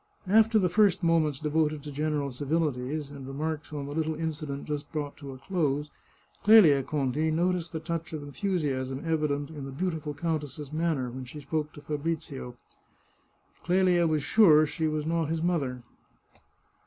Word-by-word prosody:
After 220 +3 +5
the 190 -4 +3
first 200 0 +3
moments 160 -4 +2
devoted 150 -1 0
to 150 - -7
general 145 -1 -1
civilities, 145 0 -2
and 140 -2 -9
remarks 155 +3 -4
on 145 -2 -4
the 140 - -6
little 160 0 -1
incident 150 -3 -4
just 150 -1 -4
brought 145 -2 -3
to 140 -2 -8
a 130 - -9
close, 150 -1 -1 0.5
Clelia 195 -11 +7
Conti 145 +2 -1
noticed 170 +1 0
the 160 - -3
touch 165 0 -4
of 155 -2 -5
enthusiasm 140 -4 -2
evident 150 -2 0
in 150 -3 -7
the 135 - -6
beauti 160 +3 -2
ful 150 -1 -5
countess's 150 -2 -3
manner 155 -6 0
when 130 +1 -7
she 150 +5 -9
spoke 150 +1 -2
to 145 - -11
Fabrizio. 145 -4 -4 1.1
Clelia 180 -1 +3
was 155 -2 0
sure 155 -6 +6
she 160 +1 -2
was 155 -1 -1
not 165 -1 0
his 165 0 -1
mother. 140 -8 -1
155 Hz, 165 wpm, -28 LUFS, 140-165 Hz, 1.1 s, Clelia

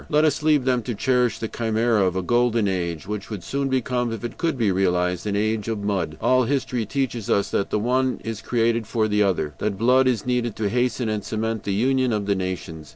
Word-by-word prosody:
Let 150 +1 +3
us 150 -1 +1
leave 150 -4 +3
them 125 -2 +2
to 120 0 -4
cherish 125 0 +1
the 110 - -3
chimera 115 -1 +1
of 90 -1 +1
a 95 - -1
golden 120 0 +2
age, 85 -4 -2
which 105 0 -5
would 105 -6 -6
soon 140 0 -2
become, 125 -2 0
if 115 -1 -5
it 120 0 -5
could 165 -5 0
be 110 -5 +2
realized, 90 0 0
an 100 - -1
age 110 +1 0
of 110 -3 -3
mud. 90 -7 -1
All 130 -1 +3
history 125 -4 -1
teaches 120 -3 -2
us 100 - +1
that 100 - 0
the - - 0
one 130 +4 +1
is 110 -1 -5
created 115 -2 0
for 110 -2 +1
the 105 0 +1
other, 90 -7 +1
that 105 -2 -1
blood 125 +4 +4
is 120 -5 0
needed 125 -3 -1
to 105 -2 -1
hasten 120 +1 0
and 105 -2 -2
cement 110 0 -3
the 100 - -1
union 130 +2 +2
of 105 -1 -1
the 100 - +2
nations. 90 -5 -5
115 Hz, 230 wpm, -23 LUFS, 100-125 Hz, -, blood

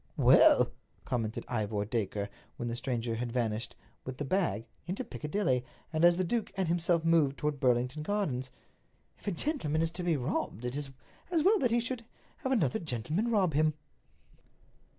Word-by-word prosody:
"Well," - - +6 0.3
commented 115 -3 -2
Ivor 105 -3 -1
Dacre, 105 -2 -2 0.3
when 120 - -3
the 115 - -2
stranger 120 -1 -2
had 120 0 -3
vanished, 115 -2 -1 0.3
with 130 0 -6
the 145 - -3
bag, 135 - 0 0.2
into 190 +8 -2
Piccadilly, 150 - -1 0.3
and 155 +1 +1
as 175 0 +7
the 185 - +2
duke 220 +4 -1
and 190 -2 +1
himself 170 0 +1
moved 160 -4 +3
toward 150 -1 -1
Burlington 125 +3 +1
Gardens, 150 -9 -1 0.7
"if - - -17
a - - +2
gentleman 165 - 0
is 165 - -1
to 175 +2 -6
be 170 -3 +1
robbed, 125 -3 -2
it 125 +2 -2
is 145 -1 -3 0.4
as 335 -4 +2
well 410 +3 +5
that 250 - +2
he 235 +1 +3
should 240 0 -3 0.3
have 265 - -3
another 165 - +2
gentleman 155 - -1
rob 195 -8 +2
him." 155 +1 +3
150 Hz, 170 wpm, -31 LUFS, 120-185 Hz, 0.7 s, as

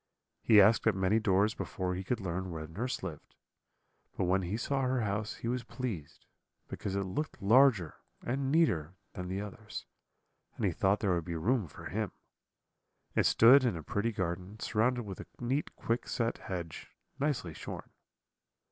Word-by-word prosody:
He 110 - +7
asked 110 +3 +6
at 110 - +4
many 95 +3 +2
doors 105 0 +3
before 90 -1 -3
he 95 +1 -3
could 115 +5 -1
learn 95 -1 -3
where 80 -2 -5
nurse 110 +11 -4
lived; 75 -3 -7 0.8
but - - +1
when 95 +2 +2
he 95 +4 -2
saw 135 +3 -1
her 130 -1 +1
house 105 +1 -2
he - - -6
was 125 0 -1
pleased, 110 - -6 0.4
because 95 - -4
it 100 - 0
looked 100 +12 -4
larger 110 - +4 0.3
and 135 +2 -1
neater 95 - +2 0.2
than 90 0 -5
the 95 +2 -2
others, 105 +1 -7 0.7
and - - -1
he - - +2
thought 100 +2 +2
there 100 -4 +2
would 85 -2 -1
be 85 - -4
room 105 +5 +1
for 70 - -12
him. - - -2 1.0
It - - +3
stood 130 +4 +7
in 120 -9 +1
a 80 - -7
pretty 105 +9 -1
garden, 95 +1 -4
surrounded 120 +3 +1
with 100 -3 -7
a - - -8
neat 130 +5 -1
quickset 115 0 -1
hedge, 85 -4 -6 0.3
nicely 135 - -1
shorn. - - -8
105 Hz, 170 wpm, -32 LUFS, 90-120 Hz, 1.0 s, He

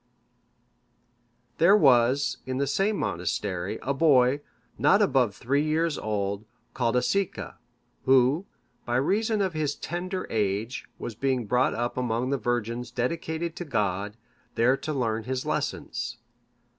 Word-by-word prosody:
] 120 0 -43
There 180 +6 +7
was, 130 - +4
in 130 0 -2
the 140 - +1
same 195 +9 +1
monastery, 90 +3 -2
a 140 - 0
boy, 135 -2 +4 0.4
not - - +5
above 125 -7 +2
three 140 +6 0
years 155 +1 +1
old, 100 -1 -2 0.3
called 120 -2 0
Aesica; 195 +9 -1 0.5
who, 135 +7 +4 0.4
by 120 - -2
reason 210 - +1
of 190 -3 -1
his 150 -2 -1
tender 185 +2 -4
age, 105 +2 -1
was 120 - -5
being 130 +1 -1
brought 125 +4 +2
up 120 +2 -2
among 125 +1 -1
the 140 - 0
virgins 120 0 -2
dedicated 160 +7 -2
to - - -3
God, 105 - -1 0.4
there 120 +3 +4
to 155 - -5
learn 115 -6 -1
his 130 0 -3
lessons. - - -3
125 Hz, 135 wpm, -27 LUFS, 115-150 Hz, 0.5 s, There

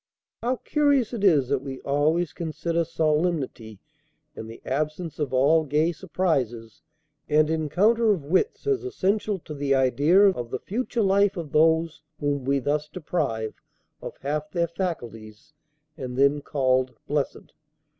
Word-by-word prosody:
How 245 +2 0
curious 285 -3 +1
it 220 -4 -4
is 150 -10 +4
that 140 -2 +1
we 135 -1 -7
always 150 +4 +1
consider 170 0 -2
solemnity 155 - -1 0.6
and 110 - -8
the 115 - -10
absence 155 +5 -3
of 150 -3 -2
all 145 +5 +4
gay 155 +3 +1
surprises 135 - -2 0.5
and 155 +1 +3
encounter 200 +9 +2
of 180 -8 -1
wits 190 - 0
as 415 -2 0
essential 210 - -1
to 160 -3 -9
the 140 -1 0
idea 145 +9 +4
of 120 -11 -4
the 130 - -3
future 235 - -2
life 200 0 +3
of 160 -5 -6
those 160 0 +2 0.2
whom 145 -2 -1
we 140 +1 +2
thus 150 +3 -1
deprive 140 -11 -2 0.5
of - - -8
half 150 +2 -2
their 170 +1 0
faculties 120 - -6 0.4
and 130 -3 -6
then 140 +2 +3
called 130 -3 0
blessed! 145 -1 -3
155 Hz, 145 wpm, -25 LUFS, 135-180 Hz, 0.6 s, is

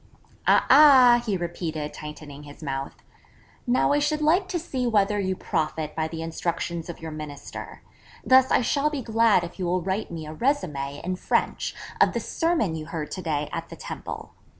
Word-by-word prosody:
'A - - +5
ah,' 260 -4 +8
he 200 -3 +1
repeated, 165 -3 -4
tightening 150 -1 -9
his 145 +2 -12
mouth, 135 -1 -5 0.6
'now 245 +3 +3
I 290 - +3
should 300 +1 0
like 355 +5 +3
to 370 - -2
see 265 -7 -2
whether 205 -2 +2
you 190 -1 -1
profit 155 -2 -2
by 160 0 -1
the 160 0 -6
instructions 170 0 -3
of 170 - -7
your 160 -1 -7
Minister: 150 -2 -8 0.4
Thus 260 0 +6
I - - +3
shall 280 +5 +1
be 290 -4 -4
glad 225 -4 +3
if 175 +3 -8
you 185 - -1
will 180 0 0
write 195 +4 -2
me 165 -2 -6
a 155 - -7
résumé 150 - -1
in 185 +1 -2
French - - -1 0.3
of - - +5
the - - -1
sermon 325 - 0
you 155 -1 -6
heard 160 -3 -5
to 185 - -4
day 150 -4 -1
at - - -4
the - - -8
Temple. - - -7
175 Hz, 190 wpm, -25 LUFS, 155-245 Hz, 0.6 s, ah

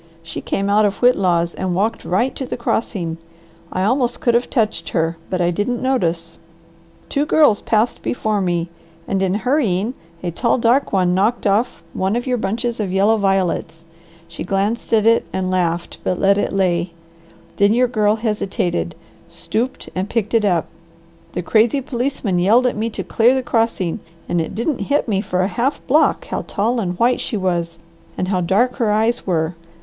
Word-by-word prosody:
She 165 -1 -6
came 195 - -2
out 205 +1 +4
of 200 -1 +1
Whitlaw's 180 -8 +3
and 185 -2 -2
walked 220 +4 0
right 240 +9 0
to 265 - -5
the - - -4
crossing. 185 -8 -2 0.5
I 185 - -1
almost 245 +3 +1
could 240 - +2
have 240 +1 +1
touched 220 -5 0
her, 165 +1 +1
but 185 -1 -1
I 175 0 +2
didn't 210 +7 -1
notice. 170 -10 -1 0.7
Two 280 - 0
girls 295 -8 +4
passed 220 +2 +1
before 215 -4 -1
me, 175 -2 -1 0.4
and 195 -1 0
in 190 0 +1
hurrying, 225 -3 0 0.3
a 175 - -2
tall, 235 +9 +1
dark 245 +3 +2
one 185 -2 +2
knocked 210 +7 +1
off 205 +4 +1
one 190 +3 0
of 240 - -2
your 250 -2 0
bunches 230 +3 -2
of 200 -4 -2
yellow 200 +4 +3
violets. 190 -4 -1 0.4
She 170 - -7
glanced 195 +5 -1
at 220 -2 +3
it 230 0 +4
and 185 -1 -2
laughed, 175 -2 -1
but 185 - 0
let 200 +2 +3
it - - -1
lay. 180 -3 0 0.6
Then 200 0 +4
your 250 +1 +3
girl 215 -3 +2
hesitated 200 -6 -2 0.3
stooped 220 +9 -3
and 185 +2 -3
picked 225 -2 -1
it 225 -2 +3
up. 175 -5 +2 0.7
The 180 - -3
crazy 225 +8 +3
policeman 245 -7 -2
yelled 220 +8 +4
at 250 - +1
me 220 +2 -1
to - - -5
clear 240 +3 +3
the 260 - -1
crossing 225 -6 0 0.3
and 175 -1 +1
it 165 - -5
didn't 240 +5 -1
hit 285 -1 +1
me 200 -3 +1
for 185 -3 -1
a 185 - +2
half 250 +7 -1
block 305 +4 +3
how - - -2
tall 230 +4 0
and 180 -4 -2
white 240 +4 +2
she 220 - -2
was 170 -3 -1 0.4
and 185 - -2
how 185 -2 +1
dark 215 +8 +1
her 230 -3 +1
eyes 220 +3 +1
were. 165 -2 0
205 Hz, 185 wpm, -19 LUFS, 180-235 Hz, 0.7 s, out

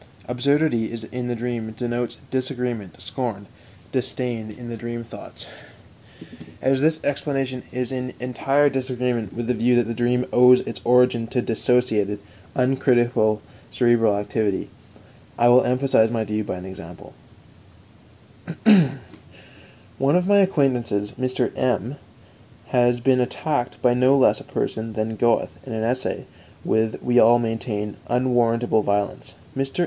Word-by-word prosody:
Absurdity 125 -1 +1 0.2
in 125 -1 -4
the 120 - -2
dream 115 -2 -4
denotes 120 +1 -3
disagreement, 125 -6 -3
scorn, 115 -6 -4 0.5
disdain 125 -3 -2
in 120 +3 -10
the 120 - -5
dream 120 +1 -5
thoughts. 115 - -10 1.1
As 135 0 +1
this 155 +1 +1
explanation 135 -3 -2
is 125 0 -3
in 125 -1 -4
entire 135 +3 +1
disagreement 125 -5 -1
with 120 0 -4
the 125 - +1
view 120 +1 +2
that 120 - +4
the 115 +1 -4
dream 125 +2 +1
owes 125 +1 +7
its - - -7
origin 125 -1 +3
to 125 +2 -1
dissociated, 110 -3 +1 0.4
uncritical 120 -4 +2 0.3
cerebral 115 -4 +3
activity, 105 -1 -2 0.7
I 120 0 +4
will 125 +1 +6
emphasize 125 -3 +3
my 115 -1 -1
view 105 0 -2
by - - -4
an 90 - -8
example: 90 -2 -10 1.5
_"One 140 - 0
of 180 0 +2
my 200 +1 +4
acquaintances, 125 - +1
Mr. 130 0 -2
M, 130 +1 -1 0.7
has 120 0 +2
been 130 +1 +3
attacked 130 0 -2
by 125 -1 +4
no 130 +3 +4
less 135 - +4
a - - -11
person 110 0 -3
than 110 +1 -2
Goethe 115 +2 +1
in 130 - -7
an 110 0 -2
essay 125 +3 -1 0.4
with, 110 0 0
we 125 0 +3
all 120 +1 +6
maintain, 110 -3 -3
unwarrantable 120 -2 +2
violence. 100 0 -2 0.2
Mr. 135 +4 -3
120 Hz, 135 wpm, -23 LUFS, 115-130 Hz, 1.5 s, owes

